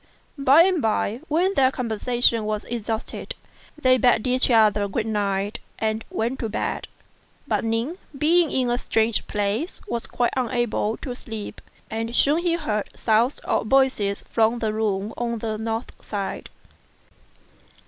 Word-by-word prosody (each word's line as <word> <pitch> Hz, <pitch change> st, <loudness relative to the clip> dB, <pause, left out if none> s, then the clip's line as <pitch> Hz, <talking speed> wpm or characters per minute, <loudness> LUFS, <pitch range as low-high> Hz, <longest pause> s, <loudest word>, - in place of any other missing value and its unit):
By 275 Hz, +4 st, +7 dB
and 365 Hz, -3 st, +2 dB
by, 220 Hz, 0 st, 0 dB
when 355 Hz, +6 st, +2 dB
their 265 Hz, -7 st, +4 dB
conversation 235 Hz, -2 st, +1 dB
was 215 Hz, 0 st, -2 dB
exhausted, 225 Hz, -1 st, -4 dB, 0.4 s
they 255 Hz, -3 st, +4 dB
bade 240 Hz, -2 st, +3 dB
each 255 Hz, +1 st, +3 dB
other 215 Hz, -3 st, +4 dB
good 215 Hz, +3 st, -2 dB
night 205 Hz, 0 st, -1 dB, 0.2 s
and 220 Hz, 0 st, -1 dB
went 240 Hz, +4 st, -2 dB
to 225 Hz, -, -2 dB
bed; 220 Hz, -, -3 dB, 0.6 s
but -, -, 0 dB
Ning, 230 Hz, -, -1 dB, 0.2 s
being 325 Hz, +3 st, +4 dB
in 255 Hz, -3 st, 0 dB
a 240 Hz, -, 0 dB
strange 225 Hz, -2 st, +1 dB
place, 210 Hz, -, -2 dB
was 235 Hz, -, -3 dB
quite 240 Hz, -1 st, 0 dB
unable 240 Hz, -3 st, 0 dB
to 250 Hz, -, -5 dB
sleep; 220 Hz, -4 st, -7 dB, 0.3 s
and 225 Hz, +2 st, -3 dB
soon 290 Hz, +6 st, +4 dB
he 345 Hz, -1 st, +1 dB
heard 215 Hz, -11 st, -2 dB
sounds 230 Hz, +4 st, +2 dB
of -, -, 0 dB
voices 260 Hz, -6 st, +2 dB
from 225 Hz, +1 st, +2 dB
the 220 Hz, -2 st, -1 dB
room 210 Hz, -1 st, -1 dB
on 235 Hz, -1 st, -2 dB
the 220 Hz, -1 st, -3 dB
north 225 Hz, +2 st, -3 dB
side. 200 Hz, -2 st, -4 dB
230 Hz, 150 wpm, -24 LUFS, 215-255 Hz, 0.6 s, By